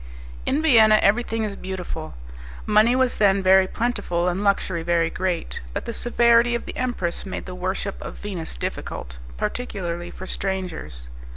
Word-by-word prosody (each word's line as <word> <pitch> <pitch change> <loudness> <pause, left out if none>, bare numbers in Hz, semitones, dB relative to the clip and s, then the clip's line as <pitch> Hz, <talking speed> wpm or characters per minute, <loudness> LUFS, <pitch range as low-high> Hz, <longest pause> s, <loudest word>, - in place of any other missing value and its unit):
In 295 +4 +1
Vienna 220 -8 +7
everything 225 +2 +2
is 205 -2 -3
beautiful; 180 -5 -6 0.5
money 215 +3 +4
was 260 -1 +2
then 200 -2 +3
very 190 0 +6
plentiful, 185 -7 -1
and 180 +3 -1
luxury 190 -4 +1
very 170 0 +1
great; 180 -3 -2
but - - -3
the 235 - -4
severity 235 0 +4
of 235 - -4
the - - -7
empress 240 -9 -1
made 190 - -6
the 185 - -7
worship 185 +2 -3
of - - -7
Venus 185 -6 -5
difficult, - - -5 0.2
particularly 175 - -3
for 185 - -9
strangers. 180 - -4
190 Hz, 155 wpm, -23 LUFS, 175-230 Hz, 0.5 s, Vienna